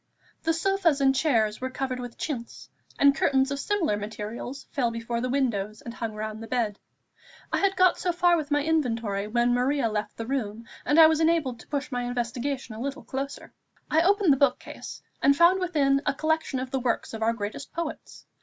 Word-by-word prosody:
The 325 - +1
sofas 340 -3 +2
and 270 -1 +4
chairs 235 -7 +1
were 260 - -2
covered 260 -1 -3
with 245 -1 -7
chintz, 245 -7 -5 0.3
and 280 0 +6
curtains 270 0 +2
of 280 - -2
similar 345 - 0
material 215 +3 -5 0.2
fell 250 -5 +1
before 230 0 -3
the 255 - -1
windows, 220 -6 -1
and 235 - -7
hung 225 -2 -4
round 215 0 -5
the 225 - -7
bed. 225 -5 -1 0.7
I - - +2
had 390 0 +2
got 370 -1 +4
so 360 - 0
far 350 0 +3
with 310 -3 -2
my 290 -1 +2
inventory 230 -10 0
when 240 +2 +2
Maria 250 0 +1
left 210 0 -3
the 230 - -4
room, 230 -4 -3 0.2
and 295 +2 +4
I 320 - +11
was 315 0 +4
enabled 320 -7 +1
to - - -14
push 290 0 -3
my 245 -1 -1
investigation 245 +1 -3
a 220 - -7
little 280 +2 -4
closer. 275 +1 -5 0.4
I 320 - +4
opened 390 -3 +4
the - - 0
book 280 +1 +3
case, - - -9 0.2
and 280 +1 +4
found 345 +4 +6
within 290 -7 +2
a - - +2
collection 315 -2 0
of 255 0 -4
the 270 - 0
works 245 -2 -1
of 225 - -6
our 225 +1 +2
greatest 215 +4 -6
poets. 335 -2 -6
265 Hz, 205 wpm, -26 LUFS, 230-305 Hz, 0.7 s, I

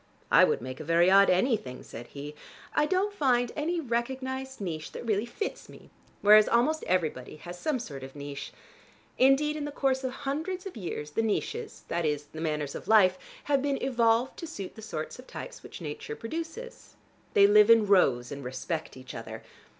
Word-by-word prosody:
"I - - +8
would - - -1
make 130 0 -6
a - - -5
very 170 +3 +4
odd 195 +1 +7
anything," 185 - +1
said 120 +1 -9
he. 145 +1 -8 0.4
"I 300 0 +3
don't 385 +3 +1
find 245 -8 +2
any 335 +3 -1
recognized 260 +1 -3
niche 165 -6 -5
that - - -7
really 215 0 0
fits 410 - -5
me, - - -15 0.3
whereas 210 +1 +7
almost 290 +7 +2
everybody 155 -9 -1
has 175 +3 -9
some 305 - 0
sort 145 - -7
of 135 +1 -10
niche. 145 -1 -7 0.7
Indeed 275 +3 +4
in 300 -1 -3
the 295 - -4
course 270 -2 0
of 260 - -1
hundreds 315 +8 -4
of 385 - -7
years 165 -7 -5
the 225 - 0
niches, 430 - -3
that 170 0 -1
is 150 -2 0
the 160 - -6
manners 150 -3 -2
of - - -8
life, 185 -4 +5 0.2
have 280 -2 +2
been 280 0 0
evolved 240 -1 +1
to 335 - -6
suit 200 - -7
the 220 - -11
sorts 165 -2 -5
of 255 - -12
types - - -8
which - - -10
nature 150 -1 -6
produces. 330 - -7 0.4
They 200 - +8
live 210 +1 +6
in 225 -2 +7
rows 165 -12 +3
and 140 0 -6
respect 130 +5 -4
each 130 0 -10
other. 110 -1 -7
220 Hz, 190 wpm, -28 LUFS, -, 0.7 s, I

